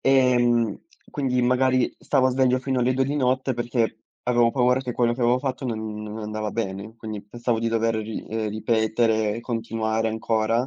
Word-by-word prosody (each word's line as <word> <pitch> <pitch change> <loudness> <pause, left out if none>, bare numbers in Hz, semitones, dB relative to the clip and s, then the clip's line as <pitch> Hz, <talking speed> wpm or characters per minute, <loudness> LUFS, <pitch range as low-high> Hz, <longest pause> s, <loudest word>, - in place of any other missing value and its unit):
ehm, 120 -4 +3 0.3
quindi 125 -3 0
magari 130 0 +2
stavo 130 -2 +2
sveglio 130 0 +2
fino 130 0 -1
alle 125 +1 +2
2 135 0 +2
di 140 +2 -2
notte 130 0 +1
perché 120 -2 -1 0.2
avevo 120 -1 +3
paura 125 +1 +2
che 125 -2 -4
quello 120 -1 +2
che 125 - -8
avevo 120 +1 +3
fatto 130 -1 -3
non 110 -2 -4
non 105 +1 -6
andava 110 0 -3
bene, 105 0 -4
quindi 110 -2 -6
pensavo 120 +2 -2
di 115 - 0
dover 115 0 +1
ri 110 0 -4
ehm, 110 -1 -2
ripetere 110 0 +1
e - - -5
continuare 115 -1 -1
ancora, 110 +2 0
115 Hz, 180 wpm, -24 LUFS, 110-125 Hz, 0.3 s, ehm